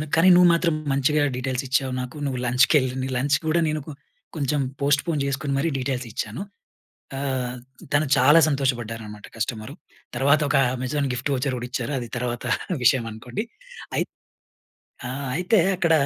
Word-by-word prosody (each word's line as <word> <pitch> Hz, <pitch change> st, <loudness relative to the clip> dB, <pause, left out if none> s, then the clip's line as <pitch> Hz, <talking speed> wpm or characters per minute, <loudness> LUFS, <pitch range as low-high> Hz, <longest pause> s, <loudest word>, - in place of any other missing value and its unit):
కానీ 165 Hz, +3 st, +6 dB
నువ్వు 180 Hz, 0 st, +7 dB
మాత్రం 170 Hz, -1 st, +2 dB, 0.2 s
మంచిగా 145 Hz, +2 st, +2 dB
డీటెయిల్స్ 130 Hz, +1 st, -2 dB
ఇచ్చావు 130 Hz, 0 st, 0 dB
నాకు. 125 Hz, +2 st, -7 dB
నువ్వు 130 Hz, -3 st, -2 dB
లంచ్‌కెళ్ 130 Hz, +2 st, +4 dB
నీ 130 Hz, -, -2 dB
లంచ్ 140 Hz, +3 st, +2 dB
గూడా" 160 Hz, +2 st, +2 dB
నేను 155 Hz, 0 st, -1 dB
కొ -, -, -6 dB, 0.4 s
కొంచెం 145 Hz, -1 st, 0 dB, 0.2 s
పోస్ట్పోన్ 145 Hz, +3 st, +1 dB
జేసుకొని 140 Hz, 0 st, -2 dB
మరీ 155 Hz, +4 st, +1 dB
డీటెయిల్స్ 130 Hz, -1 st, -2 dB
ఇచ్చాను. 110 Hz, -, -4 dB, 0.8 s
ఆహ్, 130 Hz, -2 st, -2 dB, 0.4 s
తను 145 Hz, +1 st, +3 dB
చాలా 145 Hz, +6 st, +7 dB
సంతోషపడ్డారనమాట 115 Hz, -7 st, -2 dB
కస్టమరు. 115 Hz, +3 st, -3 dB, 0.4 s
తర్వాతొక, 140 Hz, +2 st, +3 dB, 0.2 s
అమెజాన్ 130 Hz, +3 st, -1 dB
గిఫ్ట్ 125 Hz, +3 st, -3 dB
వోచర్ 130 Hz, 0 st, -1 dB
కూడిచ్చారు, 125 Hz, +2 st, -4 dB
అది 120 Hz, -, -6 dB
తర్వాత 120 Hz, -1 st, -3 dB, 0.4 s
విషయం 125 Hz, 0 st, +4 dB
అనుకోండి. 120 Hz, -, -5 dB, 0.5 s
అయిత్ -, -, -1 dB, 1.0 s
ఆ! -, -, -4 dB, 0.3 s
అయితే 180 Hz, +5 st, +2 dB, 0.2 s
అక్కడ, 170 Hz, -2 st, +2 dB
135 Hz, 140 wpm, -24 LUFS, 125-150 Hz, 1.0 s, నువ్వు